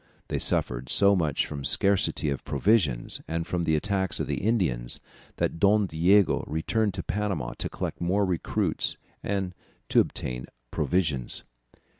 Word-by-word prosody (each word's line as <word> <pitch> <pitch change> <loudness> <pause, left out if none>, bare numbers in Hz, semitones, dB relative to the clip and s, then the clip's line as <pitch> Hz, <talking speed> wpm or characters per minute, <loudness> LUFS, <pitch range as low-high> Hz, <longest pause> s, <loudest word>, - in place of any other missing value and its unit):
They - - -1
suffered 60 +1 +1
so 100 0 +5
much 80 -6 +1
from 70 -2 -6
scarcity 95 0 +1
of 70 - -4
provisions 70 - +1
and 85 0 -2
from 85 -1 -2
the 80 - +2
attacks 95 +3 0
of - - 0
the - - -2
Indians, 90 - 0 0.4
that - - -1
Don 100 +2 +4
Diego 90 +4 +3
returned 100 +6 0
to 90 - -4
Panama 95 -13 -2
to - - -1
collect - - -5
more 95 +4 +2
recruits 90 -3 -1 0.2
and 95 -2 -2 0.4
to - - +5
obtain 60 0 -1 0.2
provisions. 75 -9 -1
90 Hz, 145 wpm, -27 LUFS, 75-100 Hz, 0.4 s, so